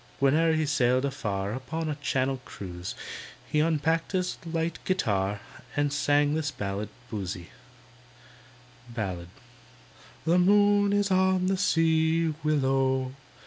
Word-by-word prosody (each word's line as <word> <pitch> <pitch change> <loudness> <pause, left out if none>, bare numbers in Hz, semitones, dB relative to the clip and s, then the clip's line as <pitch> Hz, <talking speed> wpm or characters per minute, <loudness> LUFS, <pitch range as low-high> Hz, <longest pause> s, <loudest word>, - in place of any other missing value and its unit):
Whene'er 155 +4 +4
he 155 0 +1
sailed 130 -2 +2
afar 105 -7 -2
Upon 160 +6 -4
a 155 - -1
Channel 135 -2 -1
cruise, 90 -2 -7 0.6
he 150 - +2
Unpacked 160 +2 +1
his 180 -1 -1
light 165 0 -2
guitar 100 - 0 0.3
And 145 -1 +1
sang 145 0 +2
this 155 -1 0
ballad 105 -5 -4 0.2
(Boosey): 95 -4 -5 1.4
Ballad 95 -7 -4 1.0
The 170 +2 +4
moon 205 +2 +4
is 205 -1 +1
on 185 0 +3
the 190 +1 +2
sea, 165 -2 +2
Willow! 135 -3 +1
145 Hz, 115 wpm, -27 LUFS, 125-165 Hz, 1.4 s, Whene'er